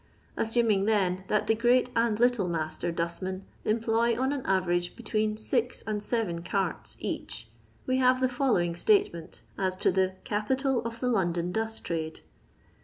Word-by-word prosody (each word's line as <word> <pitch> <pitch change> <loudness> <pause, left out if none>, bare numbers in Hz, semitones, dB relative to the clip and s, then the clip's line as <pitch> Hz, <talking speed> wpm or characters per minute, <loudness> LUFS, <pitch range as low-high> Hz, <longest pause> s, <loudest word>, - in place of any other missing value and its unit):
Assuming, 225 -3 +2
then, 190 -4 +1
that 210 - +1
the - - +3
great 245 +2 +3
and 230 -2 +2
little 240 -5 +3
master 160 0 -2
dustmen 170 +3 -3 0.2
employ 230 +1 +1
on 265 +2 +1
an 280 - -3
average 175 -2 +1
between 215 -2 -1
six 245 +2 -1
and 210 -1 -2
seren 205 -7 -1
carts 190 -1 -2
each, 110 0 -4 0.4
we 255 0 +1
have 255 0 +4
the 260 - +3
following 245 -10 +1
statement 385 - +1 0.2
as 185 -1 0
to - - +3
the 190 0 +1
Capital 260 +5 0
of 230 - -3
tok 250 -1 0
Losdon 175 -4 0
Dust 220 0 -2
Tp.ade. 160 -2 -3
215 Hz, 155 wpm, -28 LUFS, 180-240 Hz, 0.4 s, have